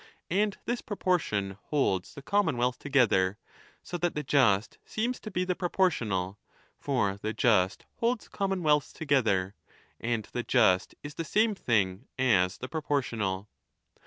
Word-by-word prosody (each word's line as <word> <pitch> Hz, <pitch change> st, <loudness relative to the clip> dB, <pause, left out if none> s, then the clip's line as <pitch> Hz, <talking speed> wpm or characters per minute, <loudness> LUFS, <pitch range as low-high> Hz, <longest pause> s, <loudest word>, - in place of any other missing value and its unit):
And 205 Hz, +2 st, +1 dB
this 240 Hz, 0 st, -1 dB
proportion 110 Hz, -, -1 dB
holds 100 Hz, -11 st, 0 dB
the 140 Hz, -, -9 dB
commonwealth 130 Hz, -11 st, +1 dB
together. 105 Hz, -9 st, +2 dB, 0.5 s
So 175 Hz, -, -5 dB
that 175 Hz, 0 st, 0 dB
the 150 Hz, -, -2 dB
just 115 Hz, -8 st, +2 dB
seems 240 Hz, +3 st, -2 dB
to 215 Hz, -, -7 dB
be 185 Hz, -2 st, -1 dB
the 180 Hz, -, +1 dB
proportional. 115 Hz, -, 0 dB, 0.4 s
For 100 Hz, -8 st, 0 dB
the 110 Hz, +1 st, -2 dB
just 105 Hz, -4 st, +2 dB
holds 235 Hz, 0 st, 0 dB
commonwealths 170 Hz, -8 st, 0 dB
together, 110 Hz, -11 st, +1 dB, 0.5 s
and 115 Hz, -2 st, -1 dB
the 120 Hz, -, -2 dB
just 105 Hz, -7 st, +3 dB
is 145 Hz, 0 st, -7 dB
the 165 Hz, -, -4 dB
same 215 Hz, +6 st, +2 dB
thing 105 Hz, -, 0 dB
as 95 Hz, -9 st, +3 dB
the 130 Hz, -, -6 dB
pro 160 Hz, +3 st, -4 dB
portional. 110 Hz, -10 st, -1 dB
130 Hz, 140 wpm, -29 LUFS, -, 0.5 s, just